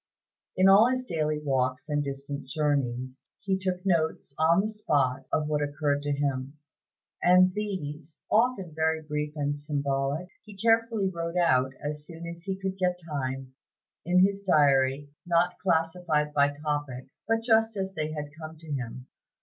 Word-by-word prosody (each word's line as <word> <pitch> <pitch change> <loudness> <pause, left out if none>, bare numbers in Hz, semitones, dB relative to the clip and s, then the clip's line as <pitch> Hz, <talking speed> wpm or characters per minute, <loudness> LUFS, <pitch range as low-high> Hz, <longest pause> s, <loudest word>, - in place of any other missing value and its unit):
In 185 +1 +5
all 205 +5 +7
his 255 0 -1
daily 155 -8 -1
walks 130 -2 -1
and 145 -1 0
distant 140 0 -5
journeys, 130 -3 -2
he 195 -1 0
took 185 -1 -3
notes 160 -6 0
on 165 +4 +5
the 210 - -1
spot 140 -11 0
of 155 - +1
what 150 -1 0
occurred 145 0 0
to 145 0 -2
him, 140 0 -2 0.6
and 185 +1 +5
these, 160 -7 -5
often 215 -7 +2
very 160 0 0
brief 150 0 -3
and 145 -1 -2
symbolic, 140 +2 -1 0.2
he 210 -2 -13
carefully 225 -1 +2
wrote 170 -1 -3
out, 130 -6 +3
as 150 0 -4
soon 170 -1 -9
as 170 0 -7
he 190 -1 -2
could 190 0 -4
get 180 -1 +1
time, 135 -3 -4 0.5
in 180 +2 +5
his 200 0 -1
diary, 145 -5 +3 0.2
not 175 +1 +2
classified 165 -3 0
by 145 0 +4
topics, 145 -3 -5
but 225 0 +1
just 225 -2 +3
as 190 0 -3
they 155 -3 -3
had 150 -1 -5
come 160 0 -8
to 155 -1 -11
him. 125 -2 -4
155 Hz, 160 wpm, -28 LUFS, 145-185 Hz, 0.6 s, all